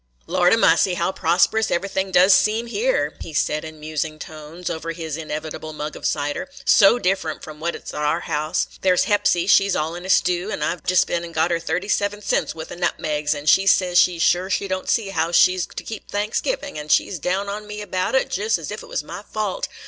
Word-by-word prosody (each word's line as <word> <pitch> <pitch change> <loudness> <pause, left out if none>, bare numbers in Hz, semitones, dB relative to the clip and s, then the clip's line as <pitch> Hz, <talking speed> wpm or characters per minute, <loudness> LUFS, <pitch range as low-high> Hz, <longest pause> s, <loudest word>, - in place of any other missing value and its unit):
"Lordy 180 - +3
massy, 180 -3 +3
how 170 +2 0
prosperous 190 +6 +2
everything 190 +1 -1
does 185 +1 +6
seem 215 +5 +3
here!" - - 0
he 160 - -8
said, 150 +1 0
in 155 -1 -9
musing 155 0 -4
tones, 155 +3 -9
over 165 +1 -3
his 160 -3 -5
inevitable 155 0 -6
mug 150 0 -5
of - - -3
cider; 145 - -2 0.2
"so 200 +4 +6
different 185 -7 -1
from 155 -1 -10
what 170 +2 -2
't - - -10
is - - -7
t' - - -8
our 150 0 0
house. 155 +3 -1
There 185 -1 +3
's - - +4
Hepsy, 205 -5 +2
she 195 +1 +4
's - - +1
all 155 +2 -1
in 175 +1 -7
a 190 - -7
stew, 180 +1 +2
an' - - -3
I - - 0
've 170 - -21
just 180 0 +3
been 170 0 -2
an' 170 -1 -8
got 160 +2 +1
her 170 - +1
thirty 170 +4 -3
seven 205 0 -1
cents' - - 0
wuth 160 0 -8
o' - - -6
nutmegs, 150 -4 -1
yet 145 +1 -8
she 195 +5 +5
says 180 -2 +4
she 180 -1 +3
's 165 - 0
sure 180 +1 +2
she 200 +1 -1
don't 185 0 -3
see 220 -4 +1
how 165 -3 -1
she 180 +1 +5
's 185 - -2
to - - -8
keep 220 - -8
Thanksgiving, 210 - -2
an' 150 - -8
she - - +4
's 180 - -6
down 190 +6 -1
on 210 +1 -5
me 210 0 -7
about 185 +2 -2
it, 265 - +2
just 210 +3 0
as 165 0 -7
ef 210 - -5
't - - -12
was - - -3
my 175 +5 -8
fault. 210 -2 -3
180 Hz, 245 wpm, -22 LUFS, 160-200 Hz, 0.2 s, does